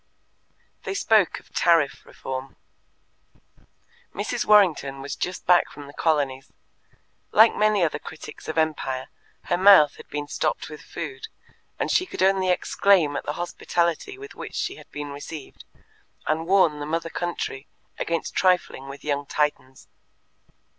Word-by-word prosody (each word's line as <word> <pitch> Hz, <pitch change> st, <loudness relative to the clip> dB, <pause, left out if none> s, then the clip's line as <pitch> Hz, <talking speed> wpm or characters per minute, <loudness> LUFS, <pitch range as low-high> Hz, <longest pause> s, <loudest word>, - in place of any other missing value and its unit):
They 390 Hz, -, -4 dB
spoke 220 Hz, -, +3 dB
of -, -, -25 dB
Tariff 165 Hz, -5 st, +2 dB
Reform. 130 Hz, 0 st, -6 dB, 1.6 s
Mrs. -, -, -2 dB
Warrington 170 Hz, -10 st, +4 dB
was 140 Hz, +1 st, -5 dB
just 180 Hz, +1 st, -4 dB
back 180 Hz, -1 st, +4 dB
from 145 Hz, 0 st, -11 dB
the 140 Hz, -, -12 dB
Colonies. 140 Hz, -5 st, 0 dB, 0.8 s
Like 220 Hz, +2 st, +7 dB
many 210 Hz, -3 st, +3 dB
other 160 Hz, -, 0 dB
critics 160 Hz, -, -10 dB
of 155 Hz, -, -4 dB
Empire, 150 Hz, -5 st, -1 dB, 0.3 s
her 175 Hz, -, 0 dB
mouth 185 Hz, -6 st, +7 dB
had -, -, -13 dB
been 145 Hz, 0 st, -4 dB
stopped -, -, -2 dB
with 150 Hz, -1 st, -9 dB
food, 135 Hz, -5 st, -7 dB, 0.5 s
and -, -, -1 dB
she 370 Hz, -, +2 dB
could -, -, -2 dB
only 190 Hz, -1 st, +3 dB
exclaim 180 Hz, -3 st, +3 dB
at -, -, -4 dB
the 150 Hz, -, -1 dB
hospitality 175 Hz, -, -2 dB
with 415 Hz, +1 st, -10 dB
which -, -, -8 dB
she 390 Hz, -, -2 dB
had -, -, -15 dB
been 145 Hz, -1 st, -6 dB
received, 145 Hz, +1 st, -9 dB, 0.6 s
and 160 Hz, +2 st, -1 dB
warn 180 Hz, -6 st, +4 dB
the 145 Hz, -, -5 dB
Mother 165 Hz, +1 st, -2 dB
Country 170 Hz, -5 st, -4 dB, 0.3 s
against 165 Hz, 0 st, -2 dB
trifling 180 Hz, -7 st, +1 dB
with 140 Hz, +1 st, -10 dB
young 145 Hz, -1 st, -2 dB
Titans. 145 Hz, -3 st, -2 dB
160 Hz, 145 wpm, -24 LUFS, 145-185 Hz, 1.6 s, Like